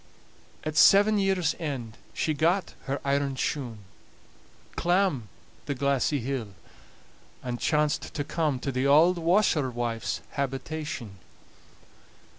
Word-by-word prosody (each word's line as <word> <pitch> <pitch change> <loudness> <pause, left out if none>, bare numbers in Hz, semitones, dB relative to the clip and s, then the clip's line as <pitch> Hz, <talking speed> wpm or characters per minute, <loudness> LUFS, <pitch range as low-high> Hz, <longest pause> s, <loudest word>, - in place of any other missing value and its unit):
At 155 0 -4
seven 205 +2 +6
years' 190 -5 +1
end 130 -8 -4 0.2
she 155 - -1
got 170 +5 +1
her 140 0 -2
iron 140 -1 0
shoon, 120 -6 -3 0.9
clamb 175 - +1 0.4
the 140 - -1
glassy 140 +2 +1
hill, 120 -5 -4 0.9
and 120 -1 -4
chanced 150 -1 0
to 145 - -1
come 150 -2 -1
to 135 - -2
the 130 +1 0
auld 165 +5 +5
washerwife's 130 - 0
habitation. 140 -5 -4
145 Hz, 105 wpm, -27 LUFS, 130-160 Hz, 0.9 s, seven